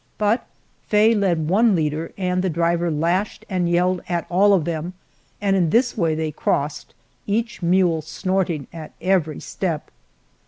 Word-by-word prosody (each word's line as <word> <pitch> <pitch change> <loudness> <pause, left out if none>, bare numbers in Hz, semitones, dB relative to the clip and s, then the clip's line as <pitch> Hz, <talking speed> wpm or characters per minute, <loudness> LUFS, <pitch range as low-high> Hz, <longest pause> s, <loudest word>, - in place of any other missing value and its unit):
But 215 +3 +1 0.4
Faye 215 +2 +4
led 180 -7 +1
one 210 +4 +4
leader, 155 0 -1
and 180 -1 0
the 190 - 0
driver 170 +1 +1
lashed 170 +6 -1
and 180 -3 0
yelled 180 +1 +1
at 170 -2 -1
all 200 +3 +5
of 175 -6 +2
them, 170 +1 -3 0.5
and 200 -1 +1
in 175 -4 +2
this 245 +7 +2
way 165 -6 +1
they 155 -1 -2
crossed, 145 0 -2 0.3
each 220 +2 -1
mule 175 -2 +2
snorting 175 -2 -2
at 160 -2 -9
every 175 -6 0
step. 170 -6 -4
175 Hz, 155 wpm, -22 LUFS, 160-195 Hz, 0.5 s, all